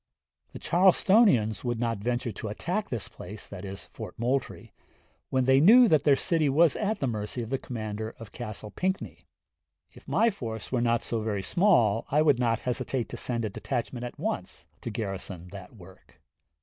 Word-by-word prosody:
The - - -8
Charlestonians 185 - +4
would 120 -2 -2
not 115 -3 -1
venture 120 +3 -2
to 110 - -6
attack 180 - -3
this 115 -5 -4
place 105 +1 -10 0.7
[Moultrie] 125 +4 -2 0.6
when 130 -1 +1
they 130 +1 +5
knew 235 - +8
that 155 -7 +3
their 145 -2 +6
city 155 +1 +1
was 160 +3 +4
at 215 0 -1
the - - 0
mercy 110 0 -3
of 115 - -8
the 135 - 0
commander 110 -3 -5
of 115 -3 -11
Castle 110 -3 -7
Pinckney.... 185 - -3 0.7
If - - -17
my 230 0 +3
force 115 - -6
was 125 -2 +1
not 120 -1 +1
so 115 -2 -2
very 105 -3 -2
small 120 - +3
I 150 +2 +3
would 145 -5 +4
not 115 -2 +1
hesitate 125 0 -2
to - - -6
send 120 -2 -2
a - - -2
detachment 120 +4 -4
at 120 - -7
once - - -4 0.2
to - - -4
garrison 95 -4 -5
that 100 +3 -10
work." 95 -2 -17
120 Hz, 175 wpm, -28 LUFS, 110-145 Hz, 0.7 s, knew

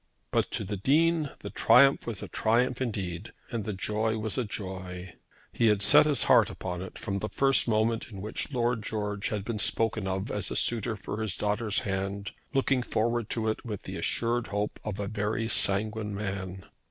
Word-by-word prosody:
But - - +1
to - - -2
the 100 +1 -4
Dean 155 - +2
the - - -7
triumph 135 0 +5
was 110 -5 -4
a - - -6
triumph 120 +3 +1
indeed 100 -5 -4 0.2
and 115 -4 -3
the 105 - -2
joy 110 +3 -1
was 110 -2 -3
a 125 - 0
joy! 95 -3 -6 0.4
He 115 - +2
had 105 -2 +3
set 150 +8 +8
his 145 -3 +4
heart - - +5
upon 90 -1 -5
it 95 - -8
from 100 0 -3
the 110 - -4
first 135 +6 +4
moment 115 0 +1
in 100 -4 -9
which 105 +8 -4
Lord 120 -3 0
George 105 -2 -3
had 105 -2 -3
been 115 -2 -3
spoken 110 -2 +2
of 95 +2 -3
as 100 -3 -2
a - - -4
suitor 115 -1 0
for 105 +1 -6
his 110 -5 -1
daughter's 105 +2 0
hand, 100 -1 -3 0.2
looking 135 -2 +1
forward 120 -1 -1
to 110 -2 -2
it 110 - -2
with 105 -5 -6
the 95 - -7
assured 115 +7 0
hope 105 +1 -3
of 105 -2 -5
a 100 - -2
very 110 +1 -2
sanguine 105 0 +1
man. 95 -2 -5
110 Hz, 195 wpm, -28 LUFS, 100-115 Hz, 0.4 s, set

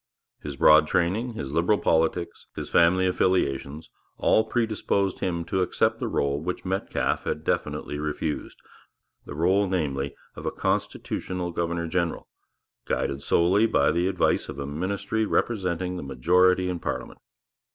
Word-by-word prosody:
His 75 -2 -6
broad 75 +3 +6
training, 95 +9 0
his 70 -11 -5
Liberal 85 +7 +2
politics, 80 +1 0
his - - -6
family 90 +2 +4
affiliations 80 -5 0 0.3
all 110 - +3
predisposed 110 -4 0
him 85 -2 -2
to 95 +3 0
accept 90 - +1
the - - -2
rôle 70 +1 0
which 90 +4 -4
Metcalfe 95 +1 -1
had 75 - -2
definitely 75 -2 -2
refused, 75 0 -3 0.7
the - - -6
rôle, 95 +5 +2
namely, 70 -6 -2 0.2
of - - -6
a - - 0
constitutional 90 -1 -2
governor 85 0 -2
general, 85 0 -2 0.6
guided 70 0 -1
solely 90 +9 +3
by - - +3
the 85 +2 +1
advice 95 - +1
of - - -6
a 70 - -4
ministry 95 +9 -2
representing 90 -5 -1
the - - -5
majority 90 +8 +3
in 90 -1 -2
parliament. - - -5
85 Hz, 140 wpm, -26 LUFS, 75-95 Hz, 0.7 s, broad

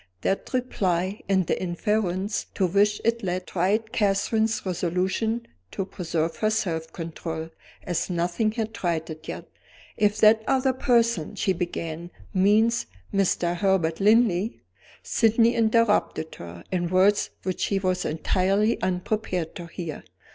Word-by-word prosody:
That 195 - -1
reply, 195 -6 -1
and 190 -2 +3
the - - -1
inference 190 +2 -1
to 190 - +2
which 205 +3 +2
it 230 0 +2
led, 180 -1 -2
tried 210 +5 0
Catherine's 215 +2 +1
resolution 185 +6 -1 0.2
to 195 - -3
preserve 165 -3 -2
her 215 - +1
self 170 -7 -2
control, 165 -1 -5 0.3
as 175 0 -2
nothing 180 +5 0
had 225 -1 -3
tried 165 -3 -2
it 155 0 -10
yet. - - -6 0.5
"If 210 -1 +2
that 220 +1 +7
other 265 0 +2
person," 235 - +1
she 190 -1 +1
began, 170 -1 -4 0.2
"means 210 +4 +3 0.3
Mr. 180 -3 +1
Herbert 175 -4 +1
Linley 215 0 +3 0.2
" - - -24
Sydney 230 +1 +3
interrupted 220 -7 +2
her, 85 0 -10
in 175 -2 0
words 190 +3 +3
which 185 -2 -3
she 200 - +1
was 185 -1 0
entirely 195 +7 +1
unprepared 185 -2 -2
to 175 -2 -7
hear. 165 -2 -6
190 Hz, 135 wpm, -25 LUFS, 175-220 Hz, 0.5 s, that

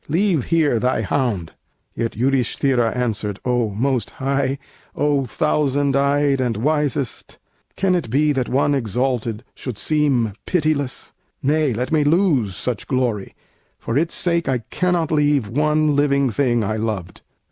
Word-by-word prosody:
Leave 170 -3 +1
here 155 -8 +2
thy 125 -1 0
hound." 105 - -1 0.4
Yet 115 0 -2
Yudhisthira 125 -1 +1
answered: 105 -5 -2
"O 125 -3 +1
Most 125 +4 -1
High, 135 0 -1 0.4
O, 145 -2 +1
Thousand 145 +2 +1
eyed 140 0 +2
and 120 -4 -1
wisest! 145 0 -1 0.4
can 190 -1 +1
it 170 -10 -1
be 150 +5 +2
That 130 -4 -1
one 140 +2 +2
exalted 120 -2 -1
should 125 -6 -6
seem 130 -3 +1
pitiless? 155 -6 -1 0.3
Nay, 150 0 +2
let 125 +3 -3
me 155 -2 +3
lose 145 - +2
such 120 0 -4
glory; 120 -7 -1 0.4
for 115 - -4
its 160 +4 +1
sake 170 -4 +1
I 125 -3 0
cannot 180 -3 0
leave 145 -6 +2
one 150 +3 +2
living 140 -2 +2
thing 120 -1 +1
I 110 +2 -1
loved." 105 -5 -4
135 Hz, 140 wpm, -20 LUFS, 115-150 Hz, 0.4 s, me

